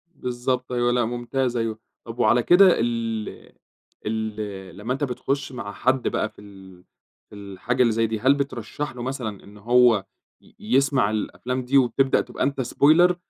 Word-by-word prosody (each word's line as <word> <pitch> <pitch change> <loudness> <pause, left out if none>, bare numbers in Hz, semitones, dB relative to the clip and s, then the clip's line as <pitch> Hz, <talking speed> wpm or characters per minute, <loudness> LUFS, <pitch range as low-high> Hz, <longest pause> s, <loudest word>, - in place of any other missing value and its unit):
بالضبط 125 0 -3
أيوه 120 0 +1
لأ 120 -1 +1
ممتاز 120 +1 -2
أيوه، 115 -1 -2 0.3
طب 115 +1 -9
وعلى 120 0 +3
كده 190 +2 +7
ال 115 -2 -3 0.5
ال 105 -4 -4
لما 115 +5 -3
أنتَ 140 - -4
بتخش 140 +2 -2
مع 100 -6 -6
حد 130 0 0
بقى 110 - -1
في 110 - -17
ال 95 -3 -15 0.5
في - - -13
الحاجة 100 +5 -3
اللي 115 -3 +4
زي 115 0 +1
دي 110 0 -3
هل 130 +5 +4
بترشح 140 0 -4
له 120 - -7
مثلًا 125 -6 -5
إن 105 +1 -15
هو 115 -2 +4 0.4
ي - - -23
يسمع 130 0 +2
الأفلام 125 +4 -3
دي 135 +3 +3
وتبدأ 135 +1 +3
تبقى - - -4
أنتَ 140 -1 0
Spoiler 160 +8 +4
120 Hz, 165 wpm, -23 LUFS, 110-130 Hz, 0.5 s, كده